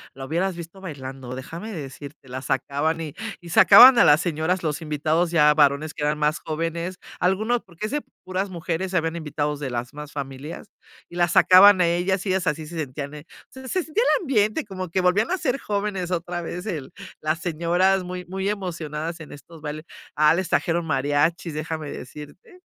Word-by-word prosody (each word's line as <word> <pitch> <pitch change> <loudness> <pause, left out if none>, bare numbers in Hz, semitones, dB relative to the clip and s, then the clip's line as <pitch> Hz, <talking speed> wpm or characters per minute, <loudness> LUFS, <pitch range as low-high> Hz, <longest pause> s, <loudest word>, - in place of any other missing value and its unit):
la 135 0 -7
hubieras 175 +5 -1
visto 170 +3 -10
bailando, 135 -6 -7
déjame 165 +11 -7
decirte, 140 -3 -9
la 130 +1 -5
sacaban 150 +4 -1
y 155 -3 -6 0.3
y 170 - -11
sacaban 245 +7 +9
a - - +8
las 150 +3 +6
señoras, 175 +2 -1
los 150 -1 -2
invitados, 155 +3 0
ya 150 -3 +5
varones 150 +1 +2
que 150 - -5
eran 150 0 +1
más 150 0 +1
jóvenes, 165 +3 -3 0.2
algunos, 215 +7 +1
porque 180 +3 -8
es 215 - -4
de 295 - -1 0.2
puras 185 +2 -3
mujeres, 180 +1 -3
habían 165 -1 0
invitados 150 -2 -3
de 140 -3 -4
las 120 0 -4
mismas 150 0 -8
familias. 140 +2 -7 0.4
Y - - -12
las 175 -1 +1
sacaban 185 +1 +8
a - - +5
ellas 180 +3 0
y 195 - -2
ellas 185 -2 0
así 155 +1 -1
se 165 +2 -8
sentían, 140 0 -5
eh, 150 0 -10 0.2
se 260 0 -11
se 370 +5 -1
sentía 410 +10 0
el - - -7
ambiente, 220 0 +1
como 185 -3 -6
que 185 +3 0
volvían 180 - +2
a 375 - 0
ser 270 -4 -1
jóvenes 200 -3 -2
otra 175 0 -2
vez 175 +2 -6
el 155 -10 -5 0.3
las 155 +1 -1
señoras 175 +3 +1
muy 180 0 -6
muy 190 +2 -3
emocionadas 165 -4 -4
en 155 - -10
estos 155 +2 -13
bailes. 155 +1 -6 0.3
Ah, 150 +1 +5
les 185 +1 -2
trajeron 170 0 +1
mariachis, 145 +4 0
déjame 155 -1 -4
decirte. 150 - -11
165 Hz, 195 wpm, -23 LUFS, 150-185 Hz, 0.4 s, sacaban